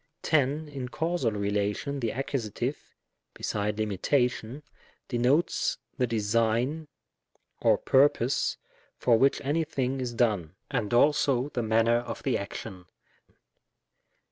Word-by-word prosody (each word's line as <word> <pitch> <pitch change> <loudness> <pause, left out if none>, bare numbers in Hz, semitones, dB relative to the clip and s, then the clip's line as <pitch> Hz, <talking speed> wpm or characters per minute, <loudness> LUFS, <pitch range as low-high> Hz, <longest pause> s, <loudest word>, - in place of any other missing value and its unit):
'' - - -53
10. 150 0 +1
In 135 -4 -6
causal 160 -5 -1
relation 105 +7 -1
the 115 -3 -1
Accus., 125 -1 -2 0.6
beside 105 0 -2
limitation, 120 +5 0 0.4
denotes 130 +7 +1 0.2
the 125 -3 +1
design 115 +7 0 0.7
or - - +4
purpose 135 -2 +2 0.4
for 120 - +3
which 135 +2 +3
any 150 +4 0
thing 135 -3 -2
is 120 -2 -4
done, 100 -8 0 0.2
and 105 - -1
also 135 0 +3
the 125 - -2
manner 115 +1 +3
of 120 0 -5
the 135 - +1
action. 100 -2 -6
120 Hz, 115 wpm, -28 LUFS, 110-140 Hz, 0.7 s, or